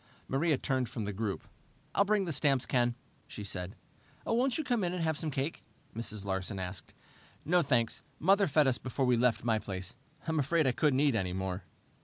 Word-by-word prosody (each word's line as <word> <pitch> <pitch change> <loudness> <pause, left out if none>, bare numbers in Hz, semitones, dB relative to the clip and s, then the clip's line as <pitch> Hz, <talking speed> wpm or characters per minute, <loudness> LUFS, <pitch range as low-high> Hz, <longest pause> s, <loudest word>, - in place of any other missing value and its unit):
Maria 150 +2 +2
turned 130 -4 0
from 115 -3 -4
the 100 - -3
group. 100 0 -3 0.5
"I'll 200 - +4
bring 205 -1 +2
the 170 - -2
stamps, 135 -3 +2
Ken," 120 -1 +2 0.3
she 105 - -7
said. 95 -2 -4 0.5
"Won't 245 +2 +2
you 315 - -1
come 240 -7 0
in 175 0 0
and 175 - -2
have 160 -1 +1
some 155 +1 -2
cake?" 140 +2 -2 0.3
Mrs. 110 -3 -4
Larsen 95 +1 -2
asked. 90 0 -6 0.5
"No, 175 +3 +4
thanks. 120 -6 +1 0.2
Mother 195 +4 +4
fed 150 +1 +4
us 130 -2 +2
before 130 +1 -1
we 125 -1 +4
left 120 -1 +2
my 110 -2 +2
place. 95 -1 -6 0.3
I'm 160 -1 +1
afraid 155 +3 +2
I 130 - +4
couldn't 135 +1 +2
eat 145 -3 +4
any 95 -5 0
more." 95 0 -3
130 Hz, 200 wpm, -32 LUFS, 105-160 Hz, 0.5 s, I'll